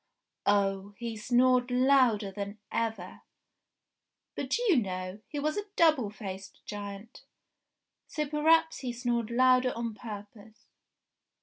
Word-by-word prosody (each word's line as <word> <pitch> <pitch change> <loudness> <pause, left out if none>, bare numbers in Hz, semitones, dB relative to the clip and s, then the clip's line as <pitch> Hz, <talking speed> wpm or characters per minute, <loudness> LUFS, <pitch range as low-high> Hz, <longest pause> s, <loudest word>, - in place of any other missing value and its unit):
Oh! 200 0 +1
he 235 -1 -5
snored 245 +3 +3
louder 250 -5 +3
than 200 +1 -6
ever! 220 -6 -3 1.1
But - - -1
you 455 - +3
know, 185 -2 -3
he 295 - -7
was 305 +4 -1
a 415 - -2
double 310 -10 +4
faced 195 -2 -9
giant; 205 +2 -8 0.9
so 300 -1 -3
perhaps 320 +2 +3
he 250 -3 -4
snored 235 -2 -1
louder 255 +1 +4
on 230 -1 -3
purpose. 210 0 -10
230 Hz, 115 wpm, -29 LUFS, 205-255 Hz, 1.1 s, double